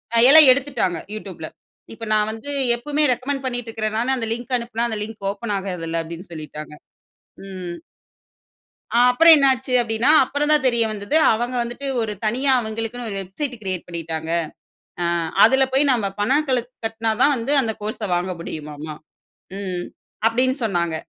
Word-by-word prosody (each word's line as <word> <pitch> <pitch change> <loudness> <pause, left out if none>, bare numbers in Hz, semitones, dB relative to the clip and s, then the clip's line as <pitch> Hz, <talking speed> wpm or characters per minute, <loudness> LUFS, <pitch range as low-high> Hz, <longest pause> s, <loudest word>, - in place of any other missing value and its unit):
அ - - +5
எல்லா 315 +3 +10
எடுத்துட்டாங்க 260 - -2 0.2
YouTubeல. 185 -7 -7 0.4
இப்போ 225 0 -8
நான் 210 0 +2
வந்து 225 +6 -7 0.3
எப்பவுமே 295 +5 -1
ரெக்கமெண்ட் 270 +2 -4
பண்ணிட்டு 245 -2 -3
இருக்கிற 220 -1 -3
நான் 245 +4 0
அந்த 230 -2 -3
லிங்க் 240 +2 -6
அனுப்புனா 235 -1 -3
அந்த 220 - -3
லிங்க் 215 -2 -8
ஓப்பன் 210 +1 -5
ஆகாதுல்ல 170 -4 -3
அப்டீன்னு 170 +3 -9
சொல்லிட்டாங்க. 155 -1 -8 0.7
ம். 185 -3 -7 1.2
ஆ, - - +1
அப்பறம் 325 +6 +8
என்னாச்சு 265 -2 +2
அப்டீன்னா 225 +3 0
அப்பறம் 290 +3 -1
தான் 295 -3 +2
தெரிய 235 -2 +2
வந்தது 205 +6 -3 0.2
அவங்க 240 +3 -2
வந்துட்டு 240 +4 -5
ஒரு 220 -2 -2
தனியா 255 +6 +2
அவங்களுக்குன்னு 225 +2 -5
ஒரு 200 - -4
வெப்சைட் 245 +9 -5
கிரியேட் 185 -3 -4
பண்ணிட்டாங்க. 165 -2 -5 0.7
அ - - 0 0.4
அதுல 265 +4 +5
போய் 275 +1 +3
நம்ம 230 -5 0
பணங்கள 265 +4 +2 0.3
கட்டுனா 225 0 -1
தான் 290 - +5
வந்து 240 +4 -2
அந்த 225 -4 -1
கோர்ஸ 215 +2 -5
வாங்க 180 +1 -1
முடியுமாம். 150 -3 -7 0.8
ம். 185 -3 -4 0.4
அப்டீன்னு 255 +4 +1
சொன்னாங்க. 170 -6 -1
225 Hz, 155 wpm, -21 LUFS, 190-255 Hz, 1.2 s, எல்லா